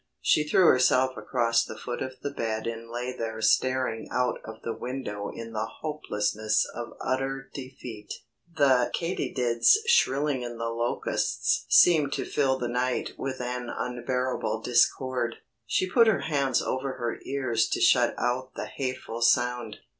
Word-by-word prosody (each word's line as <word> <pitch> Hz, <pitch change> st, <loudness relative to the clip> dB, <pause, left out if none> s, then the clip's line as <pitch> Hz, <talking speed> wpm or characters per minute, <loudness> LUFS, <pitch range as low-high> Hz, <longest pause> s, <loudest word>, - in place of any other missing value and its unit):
She 150 Hz, -, +3 dB
threw 180 Hz, +4 st, +4 dB
herself 130 Hz, -1 st, +4 dB
across 115 Hz, -3 st, +1 dB
the 110 Hz, -, -8 dB
foot 120 Hz, -1 st, -5 dB
of 130 Hz, 0 st, -3 dB
the 145 Hz, -, -2 dB
bed 110 Hz, -5 st, -3 dB
and 115 Hz, 0 st, -5 dB
lay 125 Hz, +2 st, -4 dB
there 110 Hz, -1 st, -4 dB
staring 125 Hz, +1 st, +1 dB
out 125 Hz, 0 st, 0 dB
of 110 Hz, 0 st, -10 dB
the 115 Hz, -, -2 dB
window 120 Hz, -6 st, -5 dB
in 115 Hz, 0 st, -8 dB
the 110 Hz, +1 st, -2 dB
hopelessness 110 Hz, -8 st, 0 dB
of 120 Hz, -1 st, -6 dB
utter 135 Hz, +1 st, -2 dB
defeat. 125 Hz, -5 st, -9 dB, 0.5 s
The 130 Hz, -4 st, +4 dB
katydids 125 Hz, -, +2 dB
shrilling 145 Hz, -, +2 dB
in 120 Hz, -1 st, -6 dB
the 115 Hz, 0 st, -2 dB
Locusts 115 Hz, +1 st, -1 dB
seemed 155 Hz, -5 st, +5 dB
to -, -, -2 dB
fill 135 Hz, -2 st, +1 dB
the 125 Hz, -, -2 dB
night 125 Hz, +1 st, -1 dB
with 135 Hz, -1 st, -4 dB
an 125 Hz, 0 st, -4 dB
unbearable 125 Hz, -2 st, -2 dB
discord. 125 Hz, 0 st, +1 dB, 0.3 s
She 185 Hz, -, +1 dB
put 230 Hz, +5 st, +5 dB
her 195 Hz, -10 st, +3 dB
hands 140 Hz, -5 st, +1 dB
over 130 Hz, +1 st, -2 dB
her 120 Hz, -3 st, -4 dB
ears 130 Hz, -5 st, 0 dB
to -, -, -1 dB
shut -, -, +4 dB
out 130 Hz, +1 st, -1 dB
the -, -, -4 dB
hateful 130 Hz, -3 st, -5 dB
sound. 120 Hz, -2 st, +1 dB
125 Hz, 155 wpm, -27 LUFS, 115-135 Hz, 0.5 s, seemed